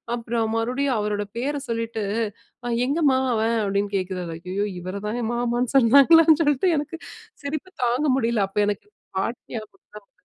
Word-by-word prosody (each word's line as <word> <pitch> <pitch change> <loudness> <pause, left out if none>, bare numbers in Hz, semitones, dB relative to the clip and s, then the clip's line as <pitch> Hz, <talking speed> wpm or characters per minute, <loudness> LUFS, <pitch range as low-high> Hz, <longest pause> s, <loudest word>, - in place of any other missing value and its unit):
அப்பறம் 230 -1 -2
மறுபடியும் 255 +3 0
அவரோட 210 0 -1
பேர 285 +4 -1
சொல்லிட்டு, 230 -1 -2 0.6
"அ 240 - -2 0.2
எங்கம்மா 285 -3 +3 0.2
அவன்?" 225 +1 +1
அப்படீன்னு 200 0 -1
கேட்கிறாரு. 185 -2 -4 0.2
ஐயயோ! 200 +3 -1
இவரை 185 +3 -5
தான 235 +2 -2
மாமான்னு 240 +1 -1
சொன்னாங்களான்னு 290 +6 +7
சொல்ட்டு 295 +4 +2
எனக்கு 295 +3 -4 0.5
சிரிப்பு 310 +5 -4
தாங்க 250 +6 +1
முடியல. 230 -5 +1
அப்ப 200 - -2
எனக்கு 210 - -3 0.3
பாட்டி 230 +5 -2
ஞாபகம் 215 -1 -9
தான் 210 - -10
வந்தது. - - -42
235 Hz, 150 wpm, -24 LUFS, 210-275 Hz, 0.6 s, சொன்னாங்களான்னு